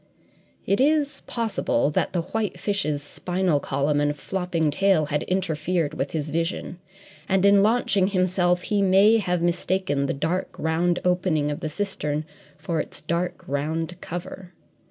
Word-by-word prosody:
It 200 - +1
is 290 0 +2
possible 220 - 0
that - - 0
the 175 -2 -1
white 220 +3 -3
fish's 150 -8 -1
spinal 180 +1 0
column 140 +2 0
and 145 0 +1
flopping 175 -2 -1
tail 190 0 +3
had 150 0 -1
interfered 170 -3 -1
with 135 - -2
his 150 -2 -3
vision, 165 +2 -2 0.5
and 190 0 +3
in 200 0 +6
launching 205 -3 +3
himself 180 -2 +1
he 205 -1 0
may 200 +4 +5
have 180 -4 -1
mistaken 175 -4 0
the - - -1
dark, 170 +6 -2
round 170 +2 +1
opening 175 -5 +1
of 145 - -4
the 160 -3 -3
cistern 150 -4 -2 0.3
for 160 +2 -2
its - - -5
dark, 175 +3 -2
round 160 +5 -2
cover. 175 +1 -7
175 Hz, 150 wpm, -24 LUFS, 150-190 Hz, 0.5 s, in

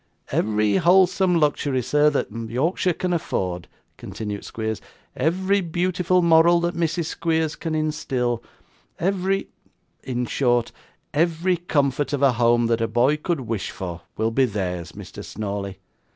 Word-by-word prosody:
'Every 105 -1 +2
wholesome 185 0 +4
luxury, 145 -4 +1
sir, 150 +4 +4
that 145 - -2
Yorkshire 125 - 0
can 180 -1 -1
afford,' 90 - -2 0.3
continued 105 +1 -6
Squeers; 110 -2 -4 0.3
'every 190 +5 +1
beautiful 180 +1 +1
moral 170 +1 +6
that 170 0 0
Mrs. 170 0 -1
Squeers 160 -1 -1
can 160 -2 -3
instil; 130 -6 -1 0.5
every 195 +1 0 0.5
in 125 -1 -2
short, 120 -2 +1 0.4
every 170 +4 +2
comfort 145 -4 0
of 140 -1 0
a 135 - +6
home 120 0 +3
that 115 0 +1
a 115 - +1
boy 120 +6 +3
could 155 -1 -2
wish 115 -4 -3
for, 90 -2 -6 0.2
will 110 +1 +1
be 130 +3 +3
theirs, 90 -6 -3
Mr. - - -9
Snawley. 100 -2 -5
145 Hz, 135 wpm, -23 LUFS, 115-170 Hz, 0.5 s, moral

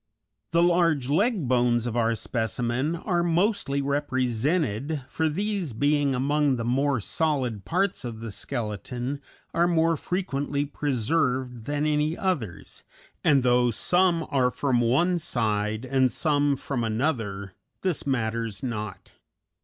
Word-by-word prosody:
The 170 +1 +3
large 165 -6 +3
leg 195 - +2
bones 120 -1 +2
of 120 -1 -3
our 115 -1 +2
specimen 120 +6 -1
are 175 +1 0
mostly 170 -4 +1
represented, 140 - 0
for 160 -1 0
these 195 - -2
being 145 +2 +2
among 145 +1 +2
the 115 -2 -3
more 135 +2 +1
solid 130 -4 -1
parts 190 -2 0
of 115 -3 -6
the 115 -1 -6
skeleton 120 +4 -4 0.3
are 170 +1 +3
more 165 -1 +3
frequently 145 -5 -2
preserved 130 -3 -1
than 145 +2 -1
any 150 +2 +1
others, 140 - -3 0.4
and 140 -4 +4
though 125 0 +4
some 175 - +2
are 130 -3 +3
from 125 -2 +1
one 170 +10 +2
side 110 -4 -1
and 130 -1 +2
some 145 -2 +2
from 130 -2 -3
another, 110 -5 -2 0.3
this 180 -6 -1
matters 115 -4 -1
not. 105 -5 -5
135 Hz, 130 wpm, -26 LUFS, 120-160 Hz, 0.4 s, and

